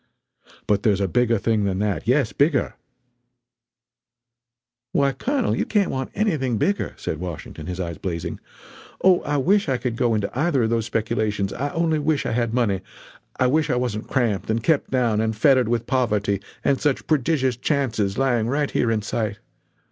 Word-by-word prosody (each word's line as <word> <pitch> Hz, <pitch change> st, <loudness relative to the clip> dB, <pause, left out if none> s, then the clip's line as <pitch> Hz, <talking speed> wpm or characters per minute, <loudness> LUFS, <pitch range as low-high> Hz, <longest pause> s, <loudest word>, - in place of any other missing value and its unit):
But 100 Hz, -1 st, +2 dB
there's 100 Hz, -2 st, +2 dB
a 100 Hz, -, +1 dB
bigger 120 Hz, +4 st, +2 dB
thing 110 Hz, 0 st, +1 dB
than 95 Hz, -2 st, -1 dB
that, 105 Hz, +1 st, -1 dB
yes 130 Hz, -2 st, +2 dB
bigger 140 Hz, -2 st, +2 dB, 1.5 s
" 120 Hz, 0 st, -65 dB
"Why 140 Hz, -1 st, +3 dB
Colonel, 245 Hz, -, -1 dB
you -, -, 0 dB
can't 205 Hz, -3 st, +1 dB
want 130 Hz, 0 st, -3 dB
anything 155 Hz, -, 0 dB
bigger!" 200 Hz, -, -1 dB
said 75 Hz, -, -4 dB
Washington, 85 Hz, -2 st, -7 dB
his 90 Hz, 0 st, -5 dB
eyes 85 Hz, -3 st, -4 dB
blazing. 85 Hz, -2 st, -4 dB, 0.6 s
"Oh, 185 Hz, -2 st, +6 dB
I 145 Hz, 0 st, -1 dB
wish 195 Hz, +5 st, +2 dB
I 130 Hz, -, +1 dB
could 125 Hz, -2 st, -3 dB
go 115 Hz, -1 st, +1 dB
into 105 Hz, -2 st, -1 dB
either 145 Hz, -2 st, +2 dB
of 110 Hz, -, 0 dB
those 115 Hz, -1 st, 0 dB
speculations 110 Hz, -3 st, -1 dB
I 145 Hz, +3 st, -2 dB
only 165 Hz, -2 st, +1 dB
wish 150 Hz, 0 st, 0 dB
I -, -, -1 dB
had 115 Hz, -1 st, 0 dB
money 110 Hz, -6 st, +1 dB, 0.6 s
I 130 Hz, -, +3 dB
wish 155 Hz, +4 st, +2 dB
I 125 Hz, -, +2 dB
wasn't 120 Hz, -4 st, -2 dB
cramped 115 Hz, -8 st, 0 dB
and 110 Hz, +1 st, 0 dB
kept 160 Hz, -1 st, +2 dB
down 120 Hz, -5 st, +1 dB
and 110 Hz, 0 st, -1 dB
fettered 130 Hz, +1 st, +4 dB
with 120 Hz, -1 st, 0 dB
poverty, 105 Hz, -7 st, 0 dB, 0.2 s
and 135 Hz, -, +2 dB
such 145 Hz, -3 st, 0 dB
prodigious 135 Hz, -3 st, +1 dB
chances 115 Hz, -7 st, -1 dB
lying 120 Hz, -4 st, +1 dB
right 145 Hz, +3 st, 0 dB
here 120 Hz, -, +1 dB
in 110 Hz, -2 st, 0 dB
sight! 105 Hz, -1 st, -2 dB
120 Hz, 180 wpm, -23 LUFS, 105-140 Hz, 1.5 s, Oh